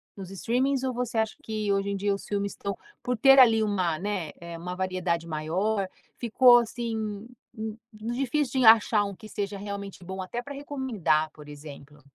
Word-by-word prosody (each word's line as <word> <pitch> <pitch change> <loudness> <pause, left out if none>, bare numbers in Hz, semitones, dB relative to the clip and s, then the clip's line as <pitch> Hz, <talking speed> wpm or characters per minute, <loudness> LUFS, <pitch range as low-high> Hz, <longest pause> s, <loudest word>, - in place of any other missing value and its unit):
nos 195 -1 -8
streamings? 255 +7 0
Ou 260 -1 -1
você 245 -1 -3
acha 220 -1 0
que 215 -2 -2
hoje 195 0 0
em 200 - -1
dia 200 0 0
os - - -9
filmes 200 -1 -2
estão 200 0 -5 0.3
por 250 -1 -1
ter, 270 +4 +7
ali, 225 -3 +7
uma, 185 -6 0
né, 190 -6 -3
eh, 170 0 -8
uma 180 +2 -5
variedade 180 -3 -1
maior, 185 +6 -1 0.3
ficou, 240 +1 +6
assim, 225 -2 -4 0.3
hum, 220 0 -5 0.2
difícil 255 +5 -1
de 245 - +4
achar 220 -1 +6
um 200 - -4
que 215 +1 -12
seja 200 -1 -4
realmente 200 -2 -7
bom, 190 +1 -5
até 235 +6 -4
pra 285 +3 -8
recomendar, 230 - 0
por 150 -1 -13
exemplo? 145 0 -11
205 Hz, 185 wpm, -27 LUFS, 185-235 Hz, 0.3 s, ter